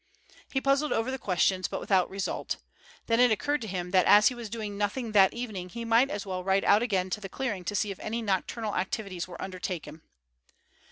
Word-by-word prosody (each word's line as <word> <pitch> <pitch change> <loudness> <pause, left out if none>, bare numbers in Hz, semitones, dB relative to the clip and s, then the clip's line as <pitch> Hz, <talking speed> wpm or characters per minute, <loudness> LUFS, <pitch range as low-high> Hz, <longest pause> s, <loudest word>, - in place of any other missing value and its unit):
He 265 - +1
puzzled 275 +2 +1
over 225 +3 0
the 265 - -4
questions 185 0 +1
but - - -4
without 190 -3 +2
result. 195 0 -3 0.5
Then 230 0 +2
it 250 0 +6
occurred 285 +7 0
to 220 - -5
him 180 -2 -4
that 185 -1 +4
as 210 +1 +7
he - - -6
was 235 -3 -7
doing 215 -2 -5
nothing 210 +3 -2
that 195 -3 +6
evening 215 -7 -5
he 230 +5 -6
might 230 +4 +4
as 205 0 -4
well 185 -2 -4
ride 195 +1 +2
out 205 +2 +5
again 190 -6 0
to 210 - -2
the 195 - -6
clearing 210 -6 -3
and 205 - -1
see 205 0 0
if 195 - -8
any 230 +2 -3
nocturnal 210 +2 -1
activities 190 -2 -3
were 175 - -10
undertaken. 180 -4 -5
205 Hz, 215 wpm, -28 LUFS, 185-230 Hz, 0.5 s, as